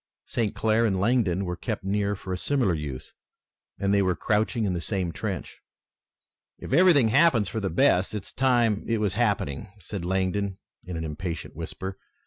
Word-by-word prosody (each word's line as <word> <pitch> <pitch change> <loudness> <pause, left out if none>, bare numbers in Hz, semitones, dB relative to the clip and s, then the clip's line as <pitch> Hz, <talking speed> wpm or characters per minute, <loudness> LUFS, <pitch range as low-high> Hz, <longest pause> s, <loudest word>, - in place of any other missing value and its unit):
St. 110 -4 -1
Clair 110 +1 +2
and 95 -3 0
Langdon 100 -4 +2
were 90 0 -3
kept - - -4
near 100 +1 0
for 95 -1 -6
a - - 0
similar 130 -9 +1
use 75 -5 -6 0.6
and 100 0 +1
they 100 - +4
were 95 -2 +1
crouching 110 +2 0
in 95 - 0
the 85 - -2
same 90 -1 -1
trench. - - -5 1.0
"If - - -6
everything 155 -7 +6
happens 130 - +4
for 110 - -3
the 100 -2 -1
best 90 +4 +3
it's 105 - -5
time 120 -5 +2
it 115 - +1
was 105 -3 0
happening," 100 - 0
said 95 0 -6
Langdon 95 +2 -1 0.3
in 90 -2 -6
an 80 - -3
impatient 80 +1 -5
whisper. 95 0 -6
100 Hz, 175 wpm, -26 LUFS, 90-110 Hz, 1.0 s, everything